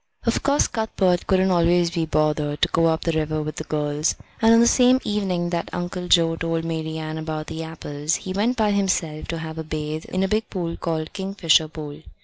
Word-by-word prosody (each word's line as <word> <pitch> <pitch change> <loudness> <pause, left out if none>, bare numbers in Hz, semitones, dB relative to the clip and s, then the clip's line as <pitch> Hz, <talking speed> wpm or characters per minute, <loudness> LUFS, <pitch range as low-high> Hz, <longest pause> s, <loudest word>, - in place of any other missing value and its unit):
Of - - +1
course 285 +1 +3
Cuthbert 190 -5 0
couldn't 190 -1 +3
always 175 0 +3
be 165 -2 -1
bothered 150 -1 0
to - - +6
go 165 0 +3
up 160 0 +1
the 165 - 0
river 155 -1 -1
with 155 0 -6
the - - -3
girls, 150 0 -1 0.3
and 225 0 +6
on 230 - +7
the 235 - +6
same 250 +1 +5
evening 185 -4 -1
that 170 -1 -2
Uncle 180 +1 -4
Joe 165 -2 +4
told 165 0 -2
Marian 160 -1 -4
about 155 -1 -4
the 160 - -6
apples 155 -1 -3
he 185 - -5
went 225 +6 0
by 215 -2 +2
himself 185 -6 -1
to 165 - -3
have 160 0 -6
a - - -3
bathe 155 0 -4
in 185 +1 -1
a - - +2
big 215 +3 -1
pool 170 -3 -3
called 160 -2 -3
Kingfisher 190 -5 +2
Pool. 150 -1 -8
165 Hz, 210 wpm, -23 LUFS, 155-190 Hz, 0.3 s, on